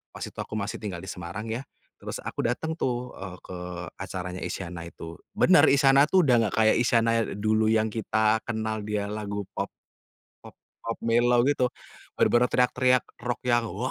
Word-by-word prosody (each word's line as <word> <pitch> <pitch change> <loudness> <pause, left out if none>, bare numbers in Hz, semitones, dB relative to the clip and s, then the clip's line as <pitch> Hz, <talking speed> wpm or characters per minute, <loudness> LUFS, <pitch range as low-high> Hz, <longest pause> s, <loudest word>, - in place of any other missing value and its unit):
pas - - -6
itu - - -11
aku - - -5
masih 100 0 -3
tinggal 100 -5 -4
di - - -9
Semarang 90 +5 -6
ya. 120 +4 -3 0.3
Terus - - -6
aku - - -4
datang, 160 +7 -1
tuh, 125 -5 -3
eee, 95 -1 -8
ke 90 - -10 0.4
acaranya 90 -1 -5
Isyana 85 -2 -5
itu, 85 0 -9 0.2
bener - - +5
Isyana, 140 0 +6
tuh, 185 -5 +4
udah 125 - +5
enggak 105 - -1
kayak 110 0 +5
Isyana 115 -1 +3 0.2
dulu 110 +1 +2
yang 110 0 +3
kita 110 0 +1
kenal 110 -2 -3
dia 105 -1 -2
lagu 105 -1 -4
pop, - - -3 0.7
pop-pop 115 - -9
mellow 120 +1 +3
gitu, 130 -1 +2 0.5
bener-bener 120 +1 +4
teriak-teriak 125 0 +3 0.2
rock 120 0 -3
yang, 120 -2 +2
waw 115 +5 -3
110 Hz, 170 wpm, -26 LUFS, 105-125 Hz, 0.7 s, Isyana